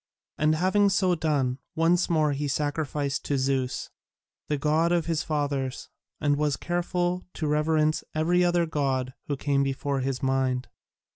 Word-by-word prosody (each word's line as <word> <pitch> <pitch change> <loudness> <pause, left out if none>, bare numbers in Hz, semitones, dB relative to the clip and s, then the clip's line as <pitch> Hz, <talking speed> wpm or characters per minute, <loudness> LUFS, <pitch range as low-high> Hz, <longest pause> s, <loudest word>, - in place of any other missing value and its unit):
And 155 +1 +3
having 190 +4 +3
so 190 -2 +2
done, 145 -6 0 0.2
once 170 +2 +2
more 155 -3 +2
he 145 +1 -2
sacrificed 145 -1 -1
to 140 - 0
Zeus, 130 -1 -1 0.6
the 150 - 0
god 155 +4 +2
of 175 -2 +2
his 165 -2 0
fathers, 145 -4 -2 0.3
and 145 -1 +2
was 150 -1 +1
careful 175 +1 -1
to 160 - -3
reverence 155 +1 +2
every 175 +3 +3
other 175 -1 +3
god 135 -5 -1
who 145 - -2
came 140 0 +1
before 140 0 -1
his 130 0 -2
mind. 130 -1 0
150 Hz, 150 wpm, -26 LUFS, 135-165 Hz, 0.6 s, And